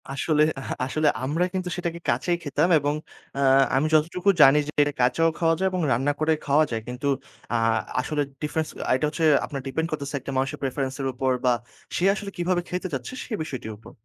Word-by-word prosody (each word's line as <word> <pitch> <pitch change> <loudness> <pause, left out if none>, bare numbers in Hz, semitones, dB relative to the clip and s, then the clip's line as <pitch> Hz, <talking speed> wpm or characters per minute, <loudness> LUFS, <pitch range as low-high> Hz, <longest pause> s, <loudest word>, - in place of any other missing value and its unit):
আসলে 150 +2 +2 0.2
আহা 135 - -4
আসলে 155 +4 0 0.2
আমরা 150 +6 0
কিন্তু 185 -1 -2
সেটাকে 170 -1 -3
কাঁচাই 175 -1 +1
খেতাম 150 +4 +1
এবং 145 +1 0 0.4
আ - - -1 0.4
আমি 140 +4 +2
যতটুকু 170 +5 +2
জানি 135 +1 +8
যে - - -4
এটা 145 0 -2
কাঁচাও 125 +7 +3
খাওয়া 165 -1 +2
যায় 190 - +2
এবং 185 -1 -1
রান্না 135 +5 +2
করে 155 +1 +3
খাওয়া 145 +2 +4
যায়। 115 -1 -2
কিন্তু 125 +3 -4 0.5
আ - - +2 0.4
আসলে 145 +3 -1 0.2
ডিফারেন্স 155 +1 -2 0.2
আ - - +2
এটা 130 - 0
হচ্ছে 160 +2 -1 0.2
আপনার 140 -2 -5
ডিপেন্ড 160 +5 -1
করছে 145 -2 -4
একটা 135 - -7
মানুষের 135 0 -1
প্রেফারেন্স 135 0 -2
এর 135 - -1
উপর 130 +1 0
বা 125 - +5 0.5
সে - - -1
আসলে 205 -1 -5
কিভাবে 175 0 +1
খেতে 180 +1 -3
চাচ্ছে 135 - -4
সে - - -17
বিষয়টির 130 -7 -6
উপর। 110 - -14
150 Hz, 200 wpm, -25 LUFS, 135-165 Hz, 0.5 s, জানি